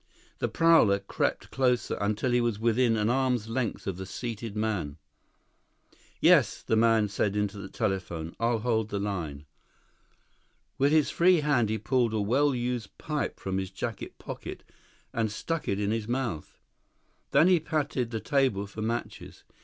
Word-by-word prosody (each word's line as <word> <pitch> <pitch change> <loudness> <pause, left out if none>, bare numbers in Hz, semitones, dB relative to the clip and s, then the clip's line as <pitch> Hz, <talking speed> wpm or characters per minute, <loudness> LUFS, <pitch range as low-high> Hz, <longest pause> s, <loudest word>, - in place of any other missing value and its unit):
The - - 0
prowler 165 -12 +5
crept 100 0 -2
closer 125 -2 +1
until 105 +5 0
he 120 0 +3
was 120 -3 0
within 115 +1 +2
an 105 0 +1
arm's 125 -3 +1
length 120 -1 -2
of 95 -3 -3
the 95 0 -6
seated 115 0 -5
man. 105 -10 -2 1.2
"Yes," - - +4
the - - +1
man 110 -1 +4
said 100 0 -1
into 105 -1 -1
the 95 -1 -7
telephone. 90 -7 -3
"I'll 115 0 +2
hold 110 -2 0
the 100 - -2
line." 85 -8 -4 1.3
With 140 +2 +4
his 155 -2 +3
free 175 -1 +4
hand 135 -7 +2
he 110 - 0
pulled 115 +1 +1
a - - +1
well 130 +7 +2
used 120 -3 -3
pipe 150 -1 -3
from 95 0 -2
his 95 -1 -4
jacket 100 +3 -6
pocket - - -8 0.5
and 110 -2 0
stuck 165 +9 -3
it 100 - 0
in 105 0 0
his 110 -1 -2
mouth. 120 - -3 0.7
Then 165 - +5
he 185 -2 +5
patted 145 -6 -1
the 115 -1 -3
table 130 -7 +1
for 105 +2 -8
matches. 115 +2 -4
115 Hz, 160 wpm, -28 LUFS, 100-125 Hz, 1.3 s, prowler